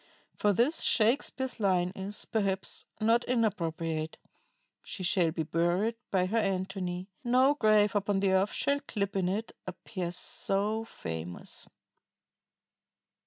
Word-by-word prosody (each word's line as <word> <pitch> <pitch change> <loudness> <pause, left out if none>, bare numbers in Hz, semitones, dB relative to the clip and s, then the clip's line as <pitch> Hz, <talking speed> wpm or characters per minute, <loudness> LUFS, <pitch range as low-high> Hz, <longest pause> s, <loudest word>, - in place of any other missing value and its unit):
For 210 - +2
this, 250 - +3
Shakespeare's 255 +2 +2
line 180 -3 +2
is, 195 +2 -5
perhaps, 195 -3 -1
not 230 +2 +3
inappropriate: 165 -9 -1 0.6
"She 190 - -6
shall 175 -2 +3
be 160 0 -2
buried 175 +8 +1 0.2
by 185 -2 +2
her 220 +5 +1
Antony; 190 -2 -2
No 255 +3 +4
grave 215 -6 +3
upon 200 -1 +1
the 195 -1 +2
earth 190 +2 +3
shall 280 0 +1
clip 200 -8 -3
in 185 -2 +1
it 215 +4 -2 0.2
A 185 - -3
pair 180 -2 -5
so 205 +4 -1
famous 80 - -6
195 Hz, 125 wpm, -30 LUFS, 180-220 Hz, 0.6 s, No